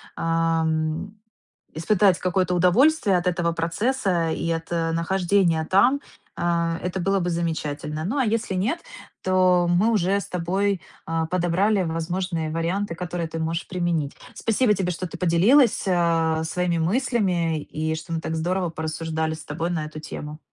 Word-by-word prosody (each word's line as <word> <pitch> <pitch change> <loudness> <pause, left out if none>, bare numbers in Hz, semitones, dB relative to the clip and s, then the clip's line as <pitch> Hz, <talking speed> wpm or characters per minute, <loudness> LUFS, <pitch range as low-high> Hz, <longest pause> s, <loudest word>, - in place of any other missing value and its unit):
ам, 165 +2 0 0.6
испытать 190 +2 +3
какое-то 185 0 0
удовольствие 200 - +4
от 175 - -2
этого 170 -1 +1
процесса 175 +1 0
и 165 - -2
от, 165 0 -2
э, 165 -1 0
нахождения 175 -1 +1
там, 245 +9 +4 0.4
э, 170 -1 0
это 180 +1 -2
было 195 +2 +1
бы 175 0 -1
замечательно. 155 -2 -3
Ну, 230 - -1
а 265 - +3
если 220 -2 -1
нет, 215 - 0 0.4
то 185 -1 +3
мы 185 +6 +3
уже 200 -1 +2
с - - -7
тобой, 190 +2 0 0.3
э, 165 0 -1
подобрали 185 +3 +2
возможные 165 0 -2
варианты, 170 +4 -1
которые 170 -1 -4
ты 165 - -5
можешь 165 +1 -2
применить. 170 -5 -1 0.2
Спасибо 225 -1 +2
тебе, 185 -2 -1
что 185 +2 -4
ты 170 - -8
поделилась, 200 - +4
э, 165 -3 +2
своими 175 +1 -1
мыслями 180 - +1
и 160 +1 -3
что 160 +1 -8
мы 165 - -1
так 160 0 -4
здорово 180 +2 -1
порассуждали 160 0 -3
с 155 - -10
тобой 165 +4 -3
на 160 -3 -1
эту 155 0 -8
тему. 150 0 -7
175 Hz, 155 wpm, -24 LUFS, 165-190 Hz, 0.6 s, удовольствие